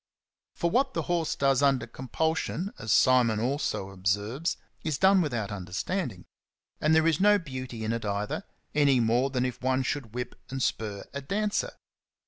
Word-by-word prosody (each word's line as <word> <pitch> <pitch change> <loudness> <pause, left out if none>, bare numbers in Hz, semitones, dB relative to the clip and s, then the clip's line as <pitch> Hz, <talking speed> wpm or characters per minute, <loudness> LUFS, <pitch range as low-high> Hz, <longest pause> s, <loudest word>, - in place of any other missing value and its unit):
For 170 - 0
what 265 +3 +2
the - - 0
horse 170 -3 0
does 135 -1 +2
under 140 -2 +3
compulsion, 160 - -2
as 110 - -3
Simon 125 -4 +5
also 120 -6 -1
observes, 100 - -1 0.3
is 155 -3 -1
done 190 +2 +5
without 120 - -2
understanding; 95 - -3 0.5
and 155 +1 +3
there 160 0 +4
is 165 -3 +3
no 205 +1 +6
beauty 130 - -6
in 110 +1 0
it 115 - -3
either, 105 0 -2 0.3
any 140 -3 +4
more 120 +4 +2
than 130 -2 0
if 125 - -4
one 130 +1 +1
should 125 -4 -3
whip 125 0 -3 0.2
and 135 +1 -4
spur 105 -3 -2
a 140 - -4
dancer. 205 +9 -1
130 Hz, 165 wpm, -28 LUFS, 115-160 Hz, 0.5 s, no